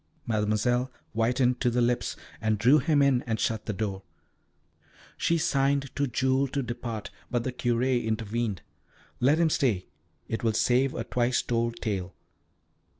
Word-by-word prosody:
Mademoiselle 115 +4 +1 0.2
whitened 125 +2 +1
to 125 - +3
the 120 +1 0
lips, 120 0 +1 0.3
and 110 -1 +1
drew 125 +8 +5
him 145 0 +3
in 135 -3 +3
and 110 -1 -1
shut 110 -2 -1
the - - 0
door. 100 -1 -3 1.1
She 170 - +1
signed 140 -2 +1
to 140 0 +1
Jules 130 +2 +1
to 140 - 0
depart, 120 -3 -5 0.2
but 120 -2 0
the 130 - -2
Curé 120 0 +1
intervened. 110 -2 -2 0.6
"Let 140 +5 +4
him 165 -1 +3
stay. 110 -12 +1 0.4
It 115 - -3
will 115 -1 +2
save 125 +4 +2
a - - -2
twice 125 0 0
told 115 -1 0
tale. 95 -5 -3
120 Hz, 150 wpm, -27 LUFS, 110-130 Hz, 1.1 s, drew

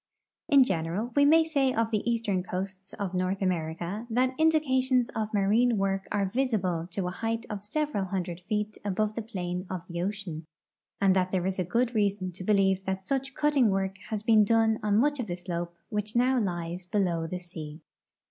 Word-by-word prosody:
In 280 -2 +7
general, 190 +3 -2
we 285 0 +5
may 320 +3 +6
say 280 -5 +1
of 225 0 +1
the 215 -2 +1
eastern 215 -5 0
coasts 190 +1 -5
of 200 -3 -4
North 185 +1 0
America 175 +4 -2
that 255 +3 +2
indications 260 -6 +3
of 215 -1 -3
marine 215 +4 +3
Avork 195 0 0
are 200 -1 +1
visible 190 -7 0
to 180 +1 -2
a - - -2
height 225 +3 -3
of 205 -1 -5
several 285 -3 -1
hundred 180 -2 -3
feet 210 +2 -3
above 210 +1 0
the 230 - -3
i)lane 180 -4 -4
of 185 -3 -4
the 170 -1 -4
ocean, 180 -5 -4 0.5
and 195 -1 +4
that 185 -1 +1
there 185 -2 0
is 190 0 -1
good 240 +5 +1
reason 200 -4 0
to 185 +1 -8
believe 195 -1 +2
that 190 0 -3
such 270 +2 -2
cutting 290 -6 +3
Avork 190 0 -1
has 215 -1 -2
been 220 -1 +6
done 225 +1 +3
on 210 -1 +2
much 290 +4 +2
of 240 - -2
the 175 -1 -3
slope 175 -1 -4 0.2
Avhich 210 +1 -2
noAV 250 0 +3
lies 175 -1 -3
beloAV 175 -4 0
the 180 - -3
sea. 160 -3 -8
200 Hz, 190 wpm, -28 LUFS, 185-230 Hz, 0.5 s, In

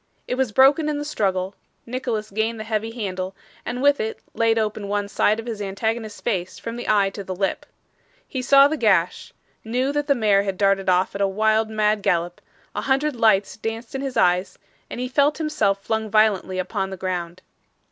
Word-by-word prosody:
It - - -2
was 255 -3 0
broken 275 +6 +5
in 295 - -1
the 290 - -4
struggle; 190 -9 -1 0.3
Nicholas 235 -4 -3
gained 220 +2 -1
the - - -4
heavy 220 0 -2
handle, 190 -5 -4 0.3
and 245 +2 -4
with 285 0 +4
it 220 0 -3 0.2
laid 230 0 +2
open 215 -2 -1
one 205 0 -1
side 210 +1 +1
of 225 - -6
his 225 -3 -5
antagonist's 215 +2 -3
face 185 -6 -2
from 230 - -6
the 240 - -5
eye 200 -2 +3
to 200 - -7
the 185 -1 -5
lip. 195 +1 -2 0.6
He 260 - -4
saw 275 +2 +6
the 310 +2 -2
gash; 195 - +1 0.3
knew 250 +5 0
that 295 0 -2
the 280 - +3
mare 210 -4 +3
had 195 -2 -3
darted 195 -1 +2
off 185 +1 +2
at 200 - -4
a 200 - +3
wild 220 +2 +1
mad 215 -1 +1
gallop; 175 -1 0 0.3
a - - -3
hundred 275 +2 +1
lights 215 -4 +3
danced 225 +1 -5
in 270 - -3
his 270 -2 -4
eyes, 180 +1 +2 0.3
and - - -6
he 250 - -2
felt 285 +3 +2
himself 215 -11 0
flung 220 -1 -2
violently 210 -3 +2
upon 190 +1 -2
the 190 - -7
ground. 180 -1 -4
215 Hz, 200 wpm, -23 LUFS, 195-245 Hz, 0.6 s, saw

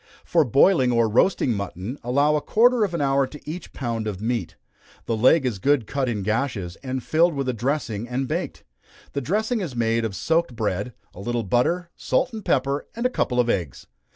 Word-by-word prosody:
For 165 -2 +3
boiling 135 - +4
or 115 -1 +3
roasting 120 - +2
mutton, 100 +5 -5
allow 140 +5 +2
a 150 - 0
quarter 240 +4 +3
of 185 -4 -1
an 165 - -1
hour 135 -1 +2
to 150 - -11
each 165 +3 -6
pound 115 -4 -3
of 100 -3 -4
meat. 110 -4 -2 0.5
The 115 - -1
leg 130 +6 +4
is 115 -6 -1
good 140 +2 +2
cut 135 +2 -1
in 105 -4 -2
gashes, 110 -5 -2
and 130 -2 -4
filled 165 +1 +2
with 135 -1 -2
a 130 - 0
dressing, 120 -2 -2
and 130 +2 -2
baked. - - -4 0.5
The 140 - -1
dressing 215 - 0
is 155 -9 -5
made 115 0 +1
of 110 -3 -3
soaked 165 - 0
bread, 105 +2 -2 0.2
a - - -12
little 120 +3 -2
butter, 170 - 0
salt, 255 -1 0
and 220 -2 -6
pepper, 140 -1 0
and 235 +2 -3
a 250 - +3
couple 125 - 0
of 120 - +3
eggs. 85 - -2
130 Hz, 205 wpm, -24 LUFS, 115-155 Hz, 0.5 s, boiling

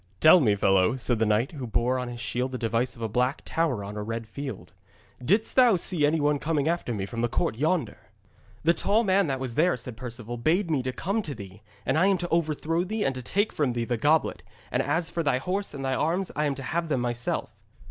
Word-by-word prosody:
'Tell 160 +3 +8
me, 110 -9 +3
fellow,' 95 +2 +3
said 120 -3 -1
the 110 - +2
knight, 110 +5 +1
who 135 -6 -6
bore 120 +3 +1
on 125 - -3
his 120 -1 -7
shield 125 +2 -2
the 130 - -3
device 115 +1 0
of 115 - -8
a - - 0
black 125 +6 0
tower 150 -11 0
on 100 +1 -7
a 105 - -4
red 115 +2 -4
field, 135 - -7 0.5
'didst 205 - +1
thou 250 -5 +6
see 165 -3 +1
any 160 +2 +1
one 145 0 +2
coming 150 -1 0
after 170 -6 -1
me 100 -4 -2
from 115 +3 -5
the 120 - +2
court 110 - 0
yonder?' 155 +7 0 0.6
'The 165 +2 +4
tall 210 +6 +2
man 195 -2 +3
that 135 -2 -1
was 130 -2 -4
there,' 165 +3 +2
said 125 -1 -7
Perceval, 120 -1 -6
'bade 165 - +1
me 145 -4 +2
to 130 0 -2
come 195 - -1
to 150 -8 -5
thee, 100 +1 -11 0.2
and 155 - +2
I 185 - +4
am 195 -1 +3
to 175 0 -4
overthrow 165 +1 0
thee 215 +3 -2
and 135 - +1
to 130 - -6
take 205 - 0
from 140 -5 0
thee 120 -1 -1
the 120 - -1
goblet, 150 +7 +2 0.3
and - - +1
as 165 +4 -1
for 170 - -1
thy 140 -5 +2
horse 190 +8 -2
and 135 -2 -5
thy 130 - 0
arms 170 +7 0
I 150 - +1
am 140 -2 0
to 135 - -7
have 165 +4 -2
them 135 -5 +1
myself.' 120 0 -2
135 Hz, 250 wpm, -27 LUFS, 120-165 Hz, 0.6 s, Tell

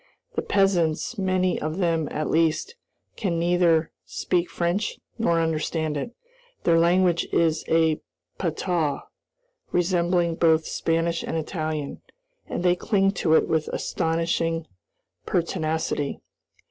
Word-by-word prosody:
The - - -1
peasants, 195 +1 +1
many 185 -1 +1
of 155 +2 -3
them 165 -4 +1
at 155 +1 -2
least, 165 - +1 0.4
can 180 -6 -1
neither 170 -1 +3
speak 175 -1 -1
French 175 +5 -1 0.2
nor 170 -7 +2
understand 160 -1 -1
it. 235 +12 -4 0.5
Their 165 -1 +4
language 175 0 +3
is 160 -1 +2
a 160 -1 +3 0.4
patois, 165 -3 -1 0.7
resembling 175 -1 +1
both 160 -1 +4
Spanish 165 0 0
and - - -3
Italian, 155 -3 -3 0.5
and - - -3
they 180 -1 +4
cling 195 0 +2
to 160 -2 +4
it - - +3
with 160 -1 0
astonishing 165 -1 -1 0.6
pertinacity. 160 -4 -1
165 Hz, 115 wpm, -25 LUFS, 160-180 Hz, 0.7 s, Their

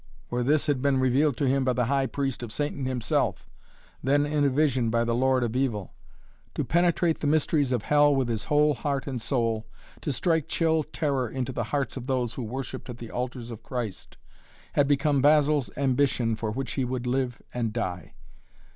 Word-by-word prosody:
For 125 - 0
this 150 +4 +2
had 145 -4 0
been 140 -1 +2
revealed 130 +1 +2
to 140 - +1
him 135 +1 +2
by 130 -1 +2
the 125 -1 +1
High 135 +2 +1
Priest 135 -3 -2
of 120 -3 -6
Satan 145 +1 -2
himself, 125 -3 -1 0.6
then 145 +2 +3
in 145 0 0
a 140 - +4
vision 130 -4 +2
by 115 +1 +2
the 115 0 0
Lord 130 +1 +2
of 120 0 -2
Evil. 115 -8 -1 0.6
To - - 0
penetrate 170 -1 +2
the 150 - -1
mysteries 145 -2 +2
of 120 -5 0
Hell 145 -1 +4
with 135 -2 +1
his 115 -3 -2
whole 150 0 +3
heart 140 +1 -2
and 130 -4 -4
soul, 115 -4 -1 0.3
to 150 - -2
strike 160 +2 +1
chill 160 -1 +2
terror 140 -5 -1
into 130 +1 -3
the 120 -3 -2
hearts 140 +1 -2
of 130 -1 -6
those 125 -4 0
who - - -5
worshipped 130 +3 -5
at 120 - -6
the 115 -2 -9
altars 125 -1 -4
of 115 -1 -8
Christ, 120 -5 -5 0.6
had 145 -1 +3
become 145 0 +2
Basil's 150 -1 +4
ambition 130 -4 +1
for 110 0 -3
which 130 +4 -3
he 135 - -1
would 125 0 -3
live 125 -1 -1
and 115 -3 -1
die. 90 -9 -4
130 Hz, 200 wpm, -27 LUFS, 120-145 Hz, 0.6 s, a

